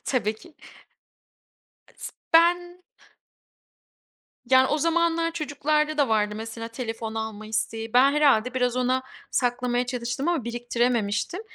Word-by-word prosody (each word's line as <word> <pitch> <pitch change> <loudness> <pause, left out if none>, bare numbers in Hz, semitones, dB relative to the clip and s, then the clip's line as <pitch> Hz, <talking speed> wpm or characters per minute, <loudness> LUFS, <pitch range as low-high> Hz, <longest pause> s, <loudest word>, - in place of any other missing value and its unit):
Tabii 220 -5 0
ki. 320 +8 -17 1.4
Is - - -8 0.2
ben 350 +2 +3 1.6
Yani, 260 +1 +5
o 300 - 0
zamanlar 330 +1 +1
çocuklarda 300 0 -1
da 285 -5 +2
vardı, 210 -1 +1
mesela, 225 +1 -6
telefon 225 -2 -5
alma 220 -1 -5
isteği. 225 +1 -3
Ben 265 +3 +6
herhâlde 265 -5 +3
biraz 250 -1 0
ona 255 +1 +1 0.3
saklamaya 245 0 0
çalıştım 250 +3 -3
ama 335 -8 0
biriktirememiştim. 240 - -1
250 Hz, 115 wpm, -25 LUFS, 225-300 Hz, 1.6 s, Ben